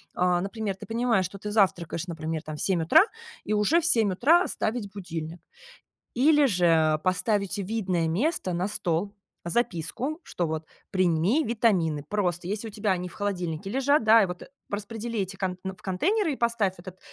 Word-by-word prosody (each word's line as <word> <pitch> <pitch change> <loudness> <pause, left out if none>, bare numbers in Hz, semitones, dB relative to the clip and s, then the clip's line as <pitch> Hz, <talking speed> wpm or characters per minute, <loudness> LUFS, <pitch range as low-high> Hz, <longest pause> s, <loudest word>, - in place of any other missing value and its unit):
А, 180 0 +2
например, 200 0 -3
ты - - -10
понимаешь, 225 -4 +1
что 195 +3 -8
ты 210 - -5
завтракаешь, 180 -5 +1
например, 160 -1 -4
там 155 -1 -6
в - - -6
7 180 -4 +1
утра, 160 - +7 0.4
и 215 - -2
уже 210 +12 +3
в - - -4
7 225 - +3
утра 325 - +4
ставить 220 -3 -3
будильник. 170 -3 -6 0.7
Или 295 +3 +4
же, 180 -8 +2
э, 160 -2 +4
поставить 200 +3 0
в 200 - -2
видное 185 -6 -1
место, 190 - 0
на 180 +3 -1
стол, 200 +1 -2 0.3
записку, 235 - -2
что 175 - -3
вот: 160 0 -4 0.2
"Прими 185 - +2
витамины". 185 - +1
Просто, 180 -4 -1
еси 210 +3 -3
у - - -6
тебя 205 -1 -1
они 180 -1 -2
в - - -16
холодильнике 190 -3 -3
лежат, 270 +1 +2
да, 220 +1 +7
и - - 0
вот 180 0 -7 0.3
распредели 220 +3 -4
эти 195 0 -3
конт 185 -2 -3
в 190 -1 -6
контейнеры, 325 - 0
и - - -4
поставь 230 -6 0
этот, 185 +1 -11
195 Hz, 180 wpm, -26 LUFS, 175-225 Hz, 0.7 s, утра